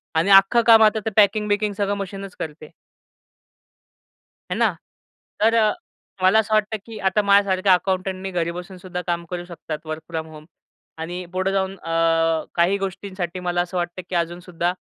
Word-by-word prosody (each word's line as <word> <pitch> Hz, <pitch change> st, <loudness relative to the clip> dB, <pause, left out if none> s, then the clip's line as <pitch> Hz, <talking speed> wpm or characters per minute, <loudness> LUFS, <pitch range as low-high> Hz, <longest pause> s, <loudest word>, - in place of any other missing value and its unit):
आणि 165 Hz, +5 st, +2 dB
अख्खं 195 Hz, +5 st, +7 dB
काम 225 Hz, -1 st, +8 dB
आता 215 Hz, 0 st, +4 dB
ते -, -, +1 dB
पॅकिंग-बिकिंग 210 Hz, 0 st, +3 dB
सगळं 205 Hz, -1 st, 0 dB
मशीनच 195 Hz, -1 st, -7 dB
करते. 155 Hz, -1 st, -7 dB, 1.8 s
आहे -, -, -2 dB
ना? -, -, +2 dB, 0.7 s
तर 225 Hz, +2 st, +4 dB, 0.7 s
मला 190 Hz, +4 st, +6 dB
असं 220 Hz, 0 st, -1 dB
वाटतं 215 Hz, 0 st, +1 dB
की 225 Hz, -2 st, -9 dB
आता 210 Hz, +2 st, +2 dB
माझ्यासारख्या 200 Hz, -1 st, +4 dB
अकाउंटंटनी 190 Hz, +1 st, -1 dB
घरी 170 Hz, -1 st, -1 dB
बसून 180 Hz, +2 st, -8 dB
सुद्धा 180 Hz, 0 st, -6 dB
काम 170 Hz, 0 st, -1 dB
करू 175 Hz, -1 st, -5 dB
शकतात 160 Hz, -3 st, -7 dB
वर्क 155 Hz, 0 st, -5 dB
फ्रॉम 160 Hz, -1 st, -4 dB
होम. 155 Hz, -1 st, -12 dB, 0.5 s
आणि 175 Hz, +3 st, -5 dB
पुढे 185 Hz, +1 st, 0 dB
जाऊन 195 Hz, 0 st, -1 dB
अ, 165 Hz, -1 st, +1 dB
काही 175 Hz, +3 st, +3 dB
गोष्टींसाठी 190 Hz, -2 st, -5 dB
मला 175 Hz, -1 st, 0 dB
असं 180 Hz, +1 st, -4 dB
वाटतं 175 Hz, +1 st, -3 dB
की 185 Hz, -, -3 dB
अजून 170 Hz, 0 st, -1 dB
सुद्धा 175 Hz, 0 st, -2 dB
185 Hz, 160 wpm, -22 LUFS, 170-200 Hz, 1.8 s, काम